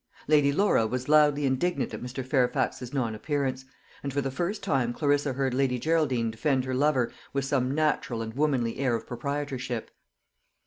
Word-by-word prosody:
Lady 145 -2 +4
Laura 150 - +3
was 125 +2 -3
loudly 150 -1 +4
indignant 135 +7 0
at - - -5
Mr. 125 +1 -5
Fairfax's 125 -1 0
non 125 -6 -1
appearance; 130 +2 -2 0.4
and 140 - -3
for 140 - -1
the 135 -1 -2
first 175 +10 -3
time 125 -4 +1
Clarissa 145 0 +1
heard 135 -1 -1
Lady 130 -1 +1
Geraldine 135 -6 +1
defend 130 +3 0
her 130 - -3
lover 130 -2 +2 0.2
with 140 -1 0
some 135 -1 0
natural 150 -7 0
and 110 0 -6
womanly 130 -5 0
air 130 -4 +2
of 115 - -5
proprietorship. 130 -2 -4
135 Hz, 170 wpm, -27 LUFS, 125-145 Hz, 0.4 s, Lady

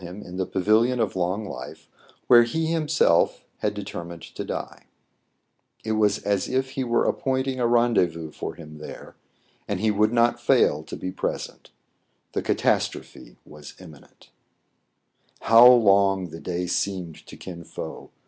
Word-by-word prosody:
him 90 +3 -9
in 90 - -10
the 95 - -2
Pavilion 110 +6 +2
of - - -1
Long 95 +4 -1
Life, 95 - -9 0.4
where 120 -1 +7
he 160 +7 -2
him^lf 155 -2 +3 0.3
had - - -1
determined 85 -1 -7
to - - -7
die - - -6 1.0
It 110 - -3
was 105 -1 +1
a» 100 -1 +2
if 130 0 -1
he 135 - -3
were 120 -1 +1
appointing 130 0 -1
a 120 - +2
rendezvous 95 -10 +1
for - - -6
him 75 -2 -12
there, 75 - -10 0.5
and 100 -2 -2
he 110 +1 +2
would 105 +1 +2
not 120 0 +2
fail 75 - +3
to - - -7
be 90 - -5
present 95 - -5 0.6
The - - -1
catai^trophe - - -2
waA 75 -1 -12
imminent 80 -6 -16 1.1
I - - -6
ÏOW 120 +1 +8
long 95 -2 +3
the 80 - -8
day 90 0 -3
seemed 90 -3 -3
to - - -11
Kin 85 -2 -9
Fo! - - -8
100 Hz, 155 wpm, -24 LUFS, 90-120 Hz, 1.1 s, ÏOW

